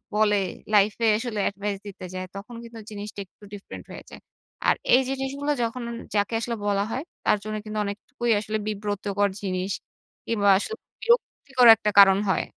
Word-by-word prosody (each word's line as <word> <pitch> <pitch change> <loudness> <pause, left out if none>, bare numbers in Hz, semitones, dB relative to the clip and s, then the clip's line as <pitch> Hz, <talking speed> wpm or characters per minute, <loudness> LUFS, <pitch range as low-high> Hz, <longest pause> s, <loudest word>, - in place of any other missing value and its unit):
বলে 210 -1 +4 0.4
লাইফ 205 0 +5
এ - - +5
আসলে 230 -3 -3
এডভাইস 200 0 -4
দিতে 190 -2 -8
যায় 185 0 -4
তখন 215 +5 -8
কিন্তু 230 -1 -10
জিনিসটা 205 0 -7
একটু 195 - -26
ডিফারেন্ট 200 -1 -9
হয়ে - - -10
যায়। - - -11 0.5
আর - - +5 0.2
এই 260 - +5
জিনিসগুলো 270 +2 -2
যখন 235 +2 -3 0.3
যাকে 205 +2 +1
আসলে 235 0 -2
বলা 200 -1 +2
হয় 265 - -2 0.2
তার - - +4
জন্য 215 0 -4
কিন্তু 215 0 -5
অনেকটুকুই 215 +3 -3
আসলে 215 +1 -2
বিব্রতকর 205 -1 -1
জিনিস 185 -1 -2 0.6
কিংবা 205 -3 +2
আসলে 440 - -3 0.3
বিরক্তিকর 280 - +3
একটা 210 -1 -1
কারণ 195 -1 +8
হয়। 190 - +1
210 Hz, 165 wpm, -25 LUFS, 200-235 Hz, 0.6 s, কারণ